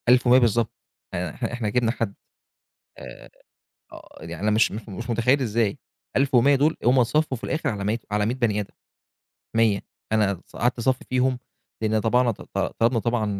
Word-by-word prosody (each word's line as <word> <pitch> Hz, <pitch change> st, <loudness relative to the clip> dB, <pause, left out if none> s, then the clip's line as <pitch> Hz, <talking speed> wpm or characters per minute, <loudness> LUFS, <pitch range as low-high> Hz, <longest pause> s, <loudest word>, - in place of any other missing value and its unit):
1100 125 Hz, 0 st, +6 dB
بالضبط، 115 Hz, -2 st, +2 dB, 0.4 s
يعني 90 Hz, +1 st, -2 dB
إحنا 120 Hz, -2 st, -4 dB
إحنا 120 Hz, -3 st, -2 dB
جبنا 120 Hz, 0 st, +1 dB
حد. 115 Hz, -4 st, -3 dB, 0.9 s
آآ، 65 Hz, -2 st, -11 dB, 0.6 s
آه، -, -, -14 dB
يعني 85 Hz, +3 st, -7 dB
أنا 105 Hz, -, +2 dB
مش 110 Hz, +2 st, +3 dB
مش 110 Hz, +1 st, -7 dB
مش 115 Hz, +5 st, -7 dB
متخيل 120 Hz, +4 st, +2 dB
إزاي. 115 Hz, -3 st, 0 dB, 0.4 s
1100 135 Hz, +1 st, +4 dB
دول 150 Hz, +4 st, +2 dB
هُم 125 Hz, +2 st, +5 dB
اتصفّوا 130 Hz, +3 st, +1 dB
في 115 Hz, -, -19 dB
الآخر 160 Hz, -, -1 dB
على 100 Hz, -3 st, -3 dB
مَيّة 110 Hz, +4 st, 0 dB
على 105 Hz, 0 st, +1 dB
مِيّة 120 Hz, +4 st, 0 dB
بَني 115 Hz, -5 st, 0 dB
آدم، 100 Hz, -, -6 dB, 0.8 s
100. 110 Hz, -3 st, +3 dB, 0.3 s
أنا 100 Hz, -4 st, +1 dB
ص -, -, -16 dB
قعدت 120 Hz, +1 st, 0 dB
اصفّي 125 Hz, +2 st, 0 dB
فيهم، 130 Hz, 0 st, +1 dB, 0.4 s
لإن 110 Hz, 0 st, +1 dB
طبعنا 120 Hz, +3 st, +2 dB
ط 110 Hz, -, -7 dB
ط -, -, -7 dB, 0.2 s
طلبنا 115 Hz, +1 st, +3 dB
طبعًا 115 Hz, -1 st, 0 dB
115 Hz, 180 wpm, -24 LUFS, 105-125 Hz, 0.9 s, 1100